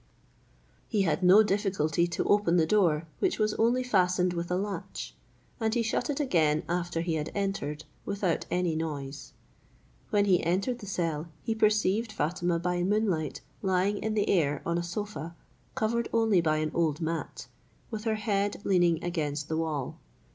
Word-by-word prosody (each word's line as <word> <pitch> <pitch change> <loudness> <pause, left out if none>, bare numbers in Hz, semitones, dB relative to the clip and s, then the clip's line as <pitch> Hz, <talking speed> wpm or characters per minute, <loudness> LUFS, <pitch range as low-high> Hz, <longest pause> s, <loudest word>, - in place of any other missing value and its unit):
He 210 -4 +1
had 165 -2 0
no 185 +4 +7
difficulty 190 -6 +1
to 170 - -2
open 205 -4 +3
the 165 - +4
door, 165 -5 +2
which 375 - +1
was 215 -1 +1
only 240 +3 +3
fastened 180 -6 +2
with 170 0 -3
a 180 - +1
latch, 200 +2 -4 0.5
and 220 0 0
he 235 - +2
shut 235 +3 -1
it 290 0 -1
again 160 - +2
after 175 -1 -1
he 170 -1 -1
had 155 -1 -2
entered, 195 -7 -2 0.2
without 195 -4 -1
any 180 -2 0
noise. 145 -3 -5 0.8
When 205 -2 +3
he 185 -3 +3
entered 195 +9 0
the 205 - -9
cell, 165 -4 -2 0.2
he 225 - 0
perceived 215 0 +2
Fatima 175 -2 0
by 175 +1 -1
moonlight 185 -6 0 0.2
lying 190 +1 +1
in 220 0 -2
the 205 -1 +1
air 150 -6 +1
on 170 0 0
a - - -2
sofa 175 -2 -5 0.4
covered 235 +2 0
only 225 -5 +3
by 155 -2 +1
an 155 0 -1
old 160 -3 +1
mat, 165 0 -4 0.5
with 220 0 -5
her 220 -1 +1
head 205 -1 0
leaning 175 -3 +3
against 150 -4 -2
the 160 - -1
wall. 155 -5 -3
180 Hz, 170 wpm, -29 LUFS, 165-210 Hz, 0.8 s, no